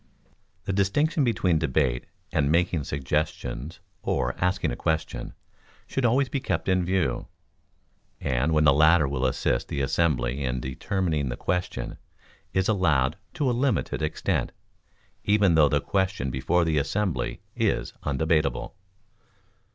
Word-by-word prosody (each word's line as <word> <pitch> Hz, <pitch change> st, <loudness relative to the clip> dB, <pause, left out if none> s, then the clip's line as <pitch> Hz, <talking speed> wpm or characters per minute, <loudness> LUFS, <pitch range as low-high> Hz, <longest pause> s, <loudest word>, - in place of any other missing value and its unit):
The 95 Hz, -, -2 dB
distinction 145 Hz, -, +2 dB
between 95 Hz, -9 st, +2 dB
debate 65 Hz, -5 st, 0 dB, 0.2 s
and 70 Hz, +1 st, +1 dB
making 85 Hz, -3 st, +1 dB
suggestions 75 Hz, +2 st, -3 dB, 0.2 s
or -, -, 0 dB
asking 90 Hz, -6 st, +1 dB
a -, -, -3 dB
question, 80 Hz, -6 st, -2 dB, 0.5 s
should 135 Hz, -, -1 dB
always 130 Hz, +4 st, +3 dB
be 140 Hz, -, -2 dB
kept 135 Hz, -, -2 dB
in 95 Hz, -1 st, +2 dB
view, 90 Hz, 0 st, 0 dB, 0.9 s
and 65 Hz, +4 st, 0 dB
when 75 Hz, -1 st, +3 dB
the 70 Hz, -, +6 dB
latter 80 Hz, +1 st, +5 dB
will 65 Hz, -1 st, 0 dB
assist -, -, 0 dB
the -, -, -3 dB
assembly 70 Hz, -2 st, +1 dB
in 65 Hz, -1 st, -1 dB
determining 75 Hz, +3 st, -1 dB
the -, -, -4 dB
question, 90 Hz, 0 st, -3 dB, 0.5 s
is 95 Hz, 0 st, +1 dB
allowed 75 Hz, -11 st, +2 dB, 0.2 s
to 145 Hz, -, 0 dB
a -, -, +3 dB
limited 125 Hz, -, 0 dB
extent, 75 Hz, -, -1 dB, 0.7 s
even 105 Hz, -3 st, +4 dB
though 75 Hz, -3 st, +5 dB
the 75 Hz, -, +2 dB
question 95 Hz, -9 st, -1 dB
before 80 Hz, +7 st, +1 dB
the 80 Hz, -2 st, +2 dB
assembly 95 Hz, +4 st, -1 dB
is -, -, 0 dB
undebatable. 75 Hz, +2 st, 0 dB
80 Hz, 135 wpm, -26 LUFS, 70-95 Hz, 0.9 s, the